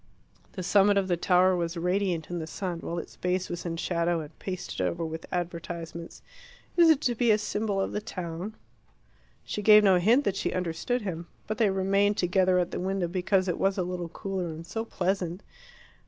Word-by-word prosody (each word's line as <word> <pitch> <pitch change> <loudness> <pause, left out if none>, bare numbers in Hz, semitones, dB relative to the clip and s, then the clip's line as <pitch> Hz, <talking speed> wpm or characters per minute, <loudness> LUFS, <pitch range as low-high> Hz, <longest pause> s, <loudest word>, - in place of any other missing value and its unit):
The 185 - -5
summit 200 +2 +4
of 195 -1 +1
the 175 - +3
tower 180 +2 +4
was 170 0 -2
radiant 180 -1 -1
in 175 - -2
the 160 - -5
sun, 175 0 -4
while 170 +1 -4
its 170 - -7
base 180 +1 -1
was 175 0 -4
in 165 -1 -3
shadow 170 -1 0
and 150 - -11
pasted 185 -2 -5
over 170 -1 -1
with 160 0 -6
advertisements. 170 -1 -5 0.5
"Is 340 -2 +6
it 310 -3 +5
to 245 - +1
be 235 0 +1
a 215 - +6
symbol 210 -1 -1
of 195 - -1
the 210 - -2
town?" 180 0 -5 0.9
She 210 - -4
gave 210 0 +8
no 190 -3 +5
hint 230 +10 +4
that 200 - 0
she - - -1
understood 185 +7 -2
him. 170 -3 -4 0.2
But 215 +1 -4
they 220 -3 +4
remained 195 +2 +2
together 185 +1 +3
at 180 -1 0
the - - -3
window 190 0 -1
because 185 +2 +1
it 175 - -1
was 195 0 +1
a 185 - +1
little 175 -1 -4
cooler 190 +1 -4
and 160 0 -7
so 225 +6 -4
pleasant. 185 -3 -2
185 Hz, 200 wpm, -28 LUFS, 170-200 Hz, 0.9 s, gave